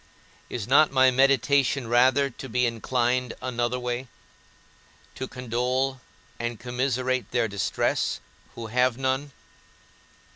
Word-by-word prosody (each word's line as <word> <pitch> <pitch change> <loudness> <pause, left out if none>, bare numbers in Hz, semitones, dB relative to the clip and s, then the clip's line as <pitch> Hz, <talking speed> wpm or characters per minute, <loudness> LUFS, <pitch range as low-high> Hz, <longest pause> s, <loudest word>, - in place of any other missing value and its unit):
Is 115 -3 -4
not 145 +4 +5
my 130 -1 +5
meditation 135 0 +3
rather 130 +4 +3
to 135 +2 -9
be 125 +2 +1
inclined 120 +1 0
another 120 0 -2
way, 125 +1 -3 1.1
to 130 - -5
condole 125 +2 -2 0.4
and 120 -2 -3
commiserate 125 -1 -1
their 120 -1 +1
distress 100 -2 -1 0.4
who 115 - -6
have 125 +2 +1
none? 135 +2 -1
125 Hz, 110 wpm, -26 LUFS, 120-130 Hz, 1.1 s, not